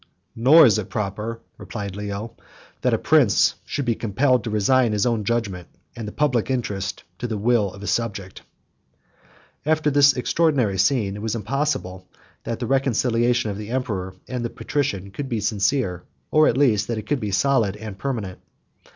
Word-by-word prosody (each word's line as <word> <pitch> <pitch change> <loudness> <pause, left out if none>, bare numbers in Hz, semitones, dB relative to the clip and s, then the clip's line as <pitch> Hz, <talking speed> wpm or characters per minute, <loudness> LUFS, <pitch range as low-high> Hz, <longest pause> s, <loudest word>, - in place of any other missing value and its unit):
"Nor 145 +8 +7
is 110 -3 +4
it 100 - -6
proper, 105 +3 -4 0.2
(replied 100 -4 -6
Leo,) 105 +2 -5 0.5
that - - +2
a - - 0
prince - - +4
should 140 - -3
be 120 - +2
compelled 120 +3 +1
to 115 - -4
resign 110 +3 +2
his 105 +1 +1
own 115 -3 0
judgment, 100 -7 -2 0.3
and 115 -2 -6
the - - -5
public 130 -5 0
interest, 100 -7 -3 0.2
to 120 - -3
the 110 -2 -3
will 105 -2 +2
of 100 +1 -11
a - - -5
subject."69 100 -5 -3 1.3
After 155 -1 +2
this 140 -1 +5
extraordinary 125 - +1
scene, 100 -1 +2
it 105 - -7
was 110 +1 -2
impossible 110 -6 -2 0.4
that 115 - -3
the 120 - -4
reconciliation 120 -3 +1
of 100 - -6
the 105 0 -7
emperor 105 -8 -3
and 125 -2 -4
the 120 - -2
patrician 100 -12 -3
could 135 +5 -5
be 115 -3 -1
sincere; 100 -2 0 0.3
or, 155 0 +5
at 120 - +1
least, 110 -7 +3
that 115 - -2
it 105 - -5
could 145 +4 0
be 105 - -3
solid 105 -1 +1
and 105 -2 -8
permanent. 110 -9 -4
115 Hz, 175 wpm, -23 LUFS, 100-130 Hz, 1.3 s, Nor